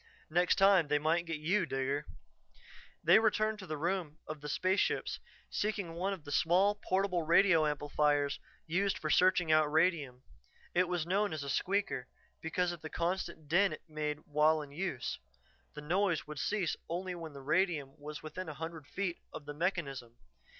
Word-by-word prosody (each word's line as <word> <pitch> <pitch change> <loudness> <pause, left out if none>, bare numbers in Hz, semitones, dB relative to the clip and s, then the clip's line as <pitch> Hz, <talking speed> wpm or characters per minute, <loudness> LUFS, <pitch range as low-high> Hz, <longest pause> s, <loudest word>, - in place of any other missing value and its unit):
Next 175 +2 +3
time 195 -5 +5
they 150 +1 +2
might 165 +3 +1
get 165 -1 -2
you, 170 +4 +1
Digger." 135 +2 -2 1.0
They - - +7
returned 215 -1 +1
to 190 - -9
the 155 -1 -3
room 170 -1 -2
of 155 -1 -7
the 150 - -6
spaceships, 185 +6 0 0.3
seeking 205 -5 -2
one 185 +4 -1
of 190 -6 -5
the 145 - -8
small, 175 +7 +4
portable 195 -3 0
radio 165 -1 +5
amplifiers 145 -1 +1 0.3
used 190 +4 0
for 155 - -2
searching 180 -3 +4
out 155 -1 +4
radium. 155 -6 +1 0.5
It 180 +1 +3
was 175 -3 -1
known 200 +2 +1
as 155 -2 -4
a 140 - -3
"squeaker" 195 -8 0 0.3
because 175 +2 0
of 175 -3 -8
the 155 - -6
constant 170 -3 -2
din 190 +6 +4
it - - -9
made 150 -1 -3
while 150 +1 +3
in 140 - -12
use; 150 -5 -3 0.6
the 150 - -6
noise 175 +2 +1
would 150 -1 -7
cease 195 +1 0
only 180 +2 -3
when 165 -3 -7
radium 145 0 0
was 150 +1 -8
within 160 +3 -6
a 150 - -7
hundred 160 -1 -7
feet 185 +1 -3
of 150 - -8
the 145 - -6
mechanism. 145 -8 -2
165 Hz, 170 wpm, -33 LUFS, 150-185 Hz, 1.0 s, They